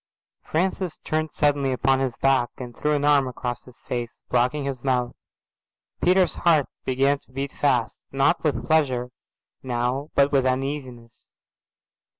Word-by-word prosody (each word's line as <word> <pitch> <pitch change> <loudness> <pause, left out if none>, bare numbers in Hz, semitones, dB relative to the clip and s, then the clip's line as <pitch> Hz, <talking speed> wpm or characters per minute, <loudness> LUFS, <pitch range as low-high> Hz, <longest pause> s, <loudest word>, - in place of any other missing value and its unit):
Francis 180 0 -1
turned 155 0 -1
suddenly 145 -3 +1
upon 135 +1 +2
his 130 -3 -1
back 135 -3 +2
and 120 -2 -8
threw 150 0 0
an 145 0 0
arm 145 -2 +4
across 120 -1 -4
his 125 -2 -16
face, 120 -2 -5
blocking 125 +4 +1
his 135 -3 -4
mouth. 125 -2 0 0.9
Peter's 185 0 +4
heart 160 -5 +4 0.2
began 135 +2 +2
to - - -11
beat 135 +1 -3
fast, 125 -5 0
not 135 +5 +2
with 140 -8 0
pleasure 130 -6 +1 0.5
now 125 +3 -2
but 140 0 +4
with 135 -2 +3
uneasiness. 130 -2 -4
135 Hz, 145 wpm, -24 LUFS, 125-145 Hz, 0.9 s, arm